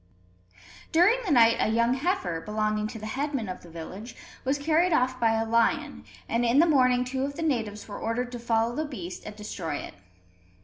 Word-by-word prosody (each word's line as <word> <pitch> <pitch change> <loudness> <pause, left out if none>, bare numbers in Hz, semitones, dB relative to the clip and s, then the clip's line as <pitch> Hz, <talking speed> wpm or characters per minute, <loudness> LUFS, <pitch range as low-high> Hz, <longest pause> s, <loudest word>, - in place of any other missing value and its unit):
During 365 +9 +5
the 365 - -1
night 230 -4 +6
a - - +2
young 235 +2 +2
heifer, 310 - -1
belonging 215 +1 -1
to 225 - -7
the 215 - -8
headman 270 0 -2
of 185 - -6
the 175 - -14
village, 190 +8 -8 0.3
was 270 +2 +1
carried 320 +5 +2
off 255 -2 +1
by 225 -2 +3
a 225 0 0
lion; 230 0 +1 0.2
and 235 +1 0
in 240 +2 +3
the 325 - +7
morning 255 -5 +3
two 260 +1 -3
of 280 +1 -3
the 330 - -4
natives 225 -9 -2
were 205 - -7
ordered 245 +2 -2
to 245 - -6
follow 230 0 0
the 310 - -1
beast 185 - -7
and 210 - -7
destroy 185 -7 -5
it. - - -6
235 Hz, 205 wpm, -27 LUFS, 215-275 Hz, 0.3 s, the